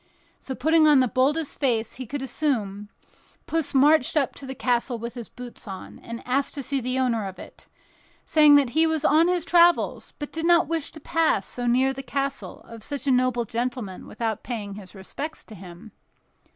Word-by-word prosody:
So, 265 - -6
putting 315 +4 +4
on 295 -3 +6
the 255 - +3
boldest 280 +5 0
face 230 -5 0
he 255 -2 -7
could 280 +2 -4
assume, 210 -8 -2 0.6
Puss 325 -4 -2
marched 290 +1 +4
up 275 -3 +1
to 275 - -10
the 265 - -6
castle 245 -1 0
with 235 +1 -6
his 240 -3 -8
boots 245 -2 -11
on, 190 -1 -9
and 235 +1 -9
asked 270 +2 0
to 280 - -4
see 275 +1 -2
the 255 +2 -2
owner 235 -5 0
of 190 - -9
it, - - -13 0.6
saying 300 -2 +6
that 275 -4 +3
he 320 +3 +3
was 315 -1 -1
on 320 +3 +5
his 355 -2 0
travels, 345 0 +3
but 290 - -6
did 325 +1 -2
not 345 -1 +5
wish 325 -3 -3
to 310 - -10
pass 315 - +1
so 245 -1 -4
near 260 +3 +3
the 270 - -6
castle 275 +1 -4
of 230 -1 -12
such 285 +2 -5
a 275 - +2
noble 250 -2 +2
gentleman 235 -4 -4
without 225 -3 -3
paying 210 -5 -5
his 195 -1 -11
respects 290 +11 -7
to 220 - -14
him. 190 +2 -12
260 Hz, 200 wpm, -25 LUFS, 230-295 Hz, 0.6 s, on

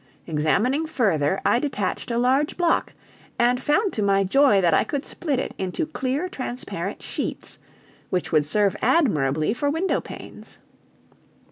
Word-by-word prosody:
Examining 205 - +1
further, 190 - +1
I - - +4
detached 265 -2 -3
a 235 - -1
large 260 +5 +1
block, 345 -2 +1 0.4
and 245 +1 +2
found 390 +9 +1
to 215 - -2
my 195 -1 +3
joy 235 +1 +4
that 175 -3 +3
I - - +4
could 285 -1 -4
split 295 -6 -2
it - - -3
into 190 - -2
clear 290 +2 -2
transparent 255 -7 -5
sheets, - - -5 0.5
which 180 -1 -2
would 150 -3 +3
serve 205 +3 +2
admirably 160 - +2
for 285 +4 -1
window 330 +6 0
panes. - - -11
245 Hz, 145 wpm, -23 LUFS, 190-290 Hz, 0.5 s, I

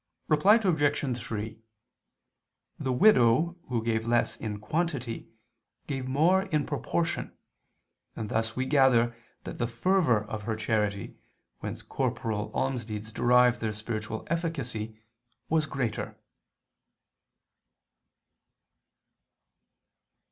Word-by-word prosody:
Reply 160 +8 +6
Obj. 150 - +1
3: 110 -1 -5 1.2
The 130 - -1
widow 155 - +5
who 120 -3 -1
gave 115 0 0
less 120 0 +2
in 105 -2 -4
quantity, 135 -1 -2 0.6
gave 135 -3 -3
more 165 +8 +4
in 150 -5 0
proportion; 165 +3 -2 0.8
and 110 - -4
thus 110 +1 -1
we 130 - -1
gather 130 -4 +4 0.3
that - - -7
the 120 - +1
fervor 125 - +2
of 105 0 -5
her 110 +1 -2
charity, 105 -3 -1 0.4
whence - - -6
corporal 110 -2 -2
almsdeeds 110 -5 -2
derive 125 +1 +4
their 110 -1 -2
spiritual 110 0 -4
efficacy, 130 -10 -3 0.5
was 155 -1 +2
greater. 125 -6 -3
120 Hz, 95 wpm, -28 LUFS, 110-150 Hz, 1.2 s, Reply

